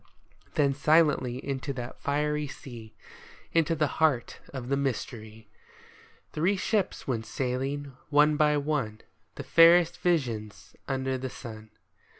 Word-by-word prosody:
Then 140 -2 +3
silently 145 -4 +3
into 140 +1 -3
that 125 -1 -7
fiery 150 +1 0
sea 120 -5 -10 0.3
— - - -22
Into 165 0 +2
the 155 - +2 0.2
heart 140 -7 +2
of 130 -3 -6
the 140 - +2
mystery 115 -5 -4 0.4
— - - -27
Three 180 +6 +1
ships 200 0 -1
went 115 -4 -2
sailing, 135 +3 -3
one 150 +1 +4
by 150 0 +3
one. 140 -7 -2 0.3
The 140 - -6
fairest 170 +4 +6
visions 120 - -2
under 130 -1 -1
the 130 0 -4
sun. 110 -3 -10
140 Hz, 135 wpm, -28 LUFS, 125-150 Hz, 0.4 s, fairest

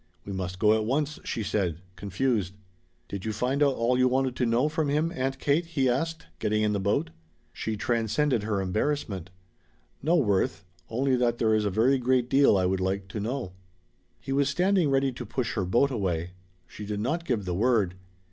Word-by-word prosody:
"We 100 - -5
must 95 -1 -4
go 105 +2 +4
at 110 0 +1
once," 145 +6 -1
she 115 - -3
said, 95 -6 -1 0.2
confused. 100 -1 -1 0.5
"Did 100 -1 -6
you 110 - -2
find 125 +6 -1
out 140 -2 +4
all 125 +2 +1
you 130 - +5
wanted 130 0 +1
to 125 - +1
know 120 +5 +2
from 155 -1 -1
him, 155 +3 +1
Aunt 135 +1 -1
Kate?" 145 +5 +1
he 140 -5 0
asked, 160 +6 -1
getting 105 0 +1
in 105 0 +1
the 100 - 0
boat. 95 -5 0 0.4
She 110 -1 -3
transcended 120 +3 +1
her 105 -2 -1
embarrassment. 100 - -2 0.7
"No, 160 +5 +2
Worth. 100 - +1 0.2
Only 130 +3 +1
that 120 -1 +1
there 110 -2 +2
is 110 -1 +2
a - - +2
very 120 +7 +3
great 125 0 +1
deal 135 -6 +5
I 95 - +2
would 95 +1 +1
like 95 +1 -2
to 105 - -5
know." 115 -2 -3 0.7
He - - -7
was 140 0 +2
standing 180 +1 +2
ready 135 0 +2
to 125 0 -7
push 120 +2 -3
her 95 -4 -1
boat 120 +9 +2
away. 90 -7 -2 0.3
She 105 - -10
did 105 0 -3
not 155 +10 -1
give 115 - -1
the 90 - -2
word. 105 -2 +2
120 Hz, 200 wpm, -27 LUFS, 100-135 Hz, 0.7 s, you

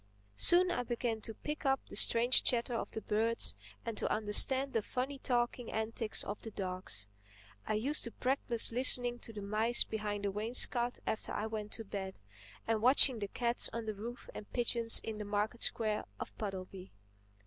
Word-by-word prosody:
Soon 355 - +5
I 245 - -1
began 240 -2 -3
to 225 0 -7
pick 300 +1 -6
up 270 -2 +2
the - - -10
strange 240 +2 +5
chatter 240 0 0
of 230 - -3
the 220 - -6
birds 225 +2 +3 0.3
and 230 -2 -4
to - - -2
understand 260 +6 +4
the 225 - +1
funny 265 +5 -4
talking 240 -2 -1
antics 220 0 -2
of 205 - -6
the 225 - -7
dogs. 185 - -6 0.6
I 215 - 0
used 270 +8 +1
to 235 - -6
practise 250 -3 0
listening 245 0 +2
to 230 - -10
the 210 -2 -8
mice 220 +4 +3
behind 210 -2 -4
the 200 - 0
wainscot 240 +3 0
after 220 - -3
I 210 - -2
went 215 -1 -5
to 225 - -6
bed, 195 -2 -6 0.5
and 225 -1 0
watching 255 0 +6
the 205 - -3
cats 235 +3 +2
on 230 0 -4
the 215 - -3
roofs 230 +4 -8
and 210 - -10
pigeons 235 -1 +3
in 220 -1 -5
the - - -4
market 210 +3 -2
square 215 -2 0
of - - -7
Puddleby. 190 -2 -7
225 Hz, 180 wpm, -33 LUFS, 210-245 Hz, 0.6 s, watching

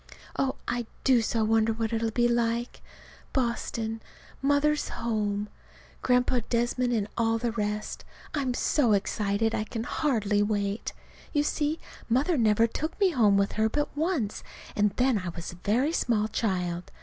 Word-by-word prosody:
Oh, 270 -1 0
I 240 -1 -2 0.2
do 255 -3 +5
so 225 0 0
wonder 225 +1 +3
what 225 0 -2
it'll 225 0 +1
be 240 +2 +2
like 235 0 0 0.5
Boston, 230 -3 -1 0.4
Mother's 285 +2 +2
home, 210 -3 -1 0.5
Grandpa 250 0 +3
Desmond, 240 +1 +1
and 215 -4 0
all 225 0 +2
the 235 0 -1
rest. 210 -1 -3 0.3
I'm 265 -4 0
so 245 -6 +2
excited 205 +2 0
I 215 - 0
can 225 +1 -4
hardly 220 -7 +1
wait. 205 0 -1 0.4
You 290 -2 +3
see, 300 +1 0 0.3
Mother 275 +9 +2
never 225 -3 +4
took 310 - -4
me 390 -3 +4
home 215 -9 +4
with 200 0 +2
her 220 0 +1
but 295 +5 -2
once, 300 - -1 0.3
and 210 0 +3
then 250 -3 +3
I 185 -2 -4
was 170 0 -6
a 175 - -12
very 240 - +1
small 215 -8 +1
child. 180 -6 -2
230 Hz, 155 wpm, -28 LUFS, 210-255 Hz, 0.5 s, do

